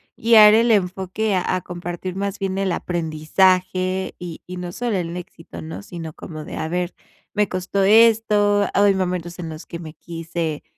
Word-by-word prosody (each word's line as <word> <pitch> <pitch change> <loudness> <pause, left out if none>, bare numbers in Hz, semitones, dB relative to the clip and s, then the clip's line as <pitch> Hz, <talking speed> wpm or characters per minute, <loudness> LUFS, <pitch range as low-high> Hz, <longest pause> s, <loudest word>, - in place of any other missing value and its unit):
guiar 220 -2 +7
el 230 +1 +4
enfoque 190 +1 0
a 180 - 0
a 185 - -2
compartir 175 +1 -6
más 200 +1 -3
bien 195 -1 -2
el 195 -2 0
aprendizaje 185 +3 0
y 175 -2 -7
y 180 0 -7
no 175 -1 -5
solo 235 -1 -2
el 170 -1 -3
éxito, 165 - -10
¿no? 85 +5 -7
Sino 165 -2 -8
como 155 -2 -9
de: - - -7
"a 160 - -2
ver, 180 +1 -2 0.4
me 210 -1 +1
costó 185 +2 -1
esto, 210 -1 +4
hay 200 0 +4
momentos 180 -2 -3
en 165 -2 -5
los 155 +1 -8
que 170 - -7
me 155 -2 -9
quise 165 -2 -5
185 Hz, 180 wpm, -21 LUFS, 170-200 Hz, 0.4 s, guiar